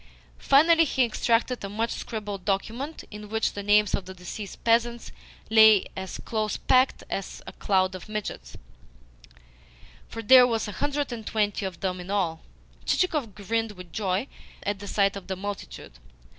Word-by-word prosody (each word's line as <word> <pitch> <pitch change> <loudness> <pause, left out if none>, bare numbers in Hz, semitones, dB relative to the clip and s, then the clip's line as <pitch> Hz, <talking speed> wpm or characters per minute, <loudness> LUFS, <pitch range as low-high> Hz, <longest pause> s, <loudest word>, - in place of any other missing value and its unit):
Finally 325 +4 +5
he 265 -3 +2
extracted 235 +1 0
a 200 - -4
much 225 +3 -2
scribbled 205 -4 -5
document 230 +10 -3
in 210 0 -9
which 220 0 0
the 205 - -5
names 210 0 +3
of 195 - -1
the 190 0 -9
deceased 185 +2 -8
peasants 235 +1 +1 0.4
lay 220 -2 +7
as 190 0 -6
close 215 -2 -1
packed 255 0 +2
as 195 - -5
a - - -9
cloud 190 -1 +1
of 185 +2 -9
midges, 205 - -5 1.5
for 225 - -7
there 250 +2 +8
were 230 -2 +1
a 210 - -5
hundred 290 +5 -2
and 225 -3 -6
twenty 210 -2 0
of 185 - -10
them 185 -1 -2
in 180 +1 -9
all. 175 -5 -1 0.4
Chichikov 300 - 0
grinned 225 +2 -2
with 180 -3 -12
joy 195 +1 -1 0.4
at 205 -1 -2
the 200 - -8
sight 200 0 +1
of 195 -2 -8
the 190 - -3
multitude. 195 - -7
210 Hz, 165 wpm, -26 LUFS, 195-230 Hz, 1.5 s, there